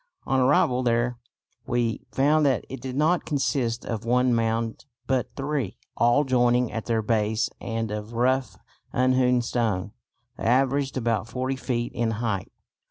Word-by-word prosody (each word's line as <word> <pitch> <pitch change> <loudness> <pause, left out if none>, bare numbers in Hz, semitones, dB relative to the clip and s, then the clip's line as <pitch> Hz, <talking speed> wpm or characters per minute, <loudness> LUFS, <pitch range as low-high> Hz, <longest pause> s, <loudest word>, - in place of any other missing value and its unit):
On 135 0 +1
arrival 130 -1 +3
there 120 0 0 0.5
we 120 -2 -1
found 150 +3 +3
that 130 -3 +1
it 135 -1 -7
did 130 -1 -5
not 160 +5 +2
consist 135 -5 -1
of 115 -3 -3
one 125 +1 +2
mound 115 +1 -1 0.2
but 130 -2 0
three, 135 -7 -2 0.2
all 120 +5 +4
joining 125 -2 +2
at 115 -2 -5
their 115 -2 +1
base 110 0 0
and 115 -1 -3
of 105 +2 -5
rough 130 +2 +1 0.3
unhewn 125 -1 +3
stone. 110 -5 -1 0.5
They - - -5
averaged 135 +3 +2
about 115 -2 0
40 130 +3 -2
feet 120 -2 -2
in 120 -2 0
height. 110 -5 -2
120 Hz, 150 wpm, -25 LUFS, 115-130 Hz, 0.5 s, all